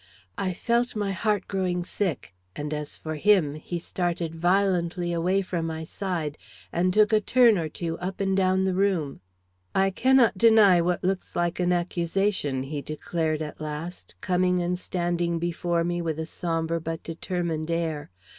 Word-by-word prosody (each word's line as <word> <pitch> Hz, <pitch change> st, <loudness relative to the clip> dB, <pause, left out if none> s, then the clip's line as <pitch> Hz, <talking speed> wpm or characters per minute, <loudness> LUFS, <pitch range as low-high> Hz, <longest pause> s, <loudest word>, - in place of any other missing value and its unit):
I 190 Hz, -1 st, 0 dB
felt, 235 Hz, +6 st, 0 dB
my 205 Hz, -2 st, -1 dB
heart 205 Hz, 0 st, 0 dB
growing 185 Hz, -2 st, -1 dB
sick, 175 Hz, -, -3 dB, 0.2 s
and 150 Hz, +1 st, -4 dB
as 150 Hz, -1 st, -5 dB
for 155 Hz, -, -5 dB
him, 185 Hz, -5 st, +4 dB
he 155 Hz, +3 st, -5 dB
started 170 Hz, -1 st, -2 dB
violently 175 Hz, 0 st, +1 dB
away 180 Hz, +4 st, +1 dB
from 170 Hz, -3 st, -2 dB
my 160 Hz, 0 st, -4 dB
side, 165 Hz, -4 st, -3 dB, 0.3 s
and 180 Hz, +2 st, +2 dB
took 210 Hz, +3 st, +4 dB
a 215 Hz, -, +5 dB
turn 240 Hz, 0 st, +5 dB
or 165 Hz, -4 st, -2 dB
two 165 Hz, +1 st, -4 dB
up 185 Hz, +2 st, -4 dB
and 195 Hz, -1 st, +1 dB
down 190 Hz, 0 st, +2 dB
the 190 Hz, -1 st, +1 dB
room. 180 Hz, -7 st, 0 dB, 0.5 s
"I 195 Hz, 0 st, +3 dB
cannot 245 Hz, -1 st, +4 dB
deny 210 Hz, -6 st, +6 dB
what 175 Hz, +1 st, 0 dB
looks 185 Hz, 0 st, -2 dB
like 175 Hz, 0 st, 0 dB
an 180 Hz, 0 st, +2 dB
accusation," 175 Hz, -4 st, 0 dB
he 145 Hz, +1 st, -4 dB
declared 155 Hz, +1 st, -2 dB
at 150 Hz, 0 st, -8 dB
last, 155 Hz, +4 st, -6 dB
coming 180 Hz, 0 st, +2 dB
and 180 Hz, +1 st, -1 dB
standing 175 Hz, -2 st, -1 dB
before 170 Hz, 0 st, -1 dB
me 175 Hz, 0 st, -1 dB
with 160 Hz, -2 st, -2 dB
a 160 Hz, -, -3 dB
sombre 165 Hz, 0 st, -2 dB
but 165 Hz, 0 st, -4 dB
determined 165 Hz, -1 st, -3 dB
air. 165 Hz, -3 st, -2 dB
175 Hz, 165 wpm, -26 LUFS, 165-190 Hz, 0.5 s, deny